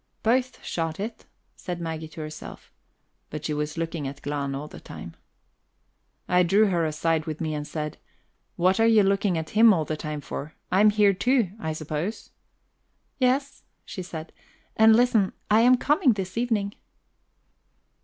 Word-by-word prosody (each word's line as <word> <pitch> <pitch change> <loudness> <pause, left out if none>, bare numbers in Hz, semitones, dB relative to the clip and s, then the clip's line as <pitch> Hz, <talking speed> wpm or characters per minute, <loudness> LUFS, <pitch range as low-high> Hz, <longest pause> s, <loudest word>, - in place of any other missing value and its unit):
"Both 250 +3 0
shot 165 0 -3
it," 220 +3 -6 0.3
said 175 -1 -6
Maggie 160 -1 -4
to 155 +1 -9
herself; 155 0 -9 0.6
but 150 0 -6
she 155 - -1
was 150 +2 -3
looking 165 -3 -3
at 140 +1 -7
Glahn 140 -1 -2
all 145 +2 -5
the - - -11
time. - - -10 1.1
I 180 0 +4
drew 200 +4 +4
her 175 -3 +1
aside 160 +1 0
with 155 -1 -4
me 155 -2 -2
and 150 -1 -4
said: 150 -1 -5 0.6
"What 185 +4 +2
are 225 - +5
you 220 -2 +5
looking 195 -2 +1
at 160 0 -4
him 225 +1 +7
all 160 -3 -1
the 155 - -2
time 150 -1 -5
for? 145 +2 -7 0.2
I 190 - +4
am 215 - +7
here 205 -1 +4
too, 240 -1 +1
I 160 -4 -3
suppose?" 155 +6 -4 0.9
"Yes," 270 +2 +1 0.2
she 185 - -6
said. 165 -2 -8 0.4
"And 220 0 +7
listen: 230 -5 +3 0.2
I 215 +2 +6
am 250 +2 +6
coming 295 -1 +3
this 190 -3 -5
evening." 225 -4 0
180 Hz, 165 wpm, -25 LUFS, 155-220 Hz, 1.1 s, him